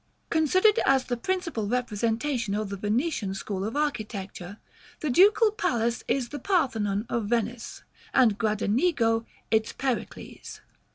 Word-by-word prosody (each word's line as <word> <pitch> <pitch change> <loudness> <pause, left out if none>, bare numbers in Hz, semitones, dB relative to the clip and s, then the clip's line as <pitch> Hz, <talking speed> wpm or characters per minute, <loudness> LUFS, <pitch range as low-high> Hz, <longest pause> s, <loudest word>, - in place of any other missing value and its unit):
Considered 370 +7 +4
as 270 -1 +3
the 250 -1 -2
principal 335 - -2
representation 230 0 -1
of 210 -1 -2
the 200 - -4
Venetian 210 - -1
school 195 -1 -4
of 220 +5 -4
architecture, 205 -9 -3 0.4
the 300 - -1
Ducal 420 - +5
Palace 235 - -1
is 255 -3 0
the 290 - -6
Parthenon 225 - 0
of 235 -2 -2
Venice, 235 +1 -2 0.3
and 240 -6 +4
Gradenigo 225 - +1 0.2
its 220 0 +1
Pericles. 265 -3 -5
235 Hz, 125 wpm, -27 LUFS, 215-290 Hz, 0.4 s, Ducal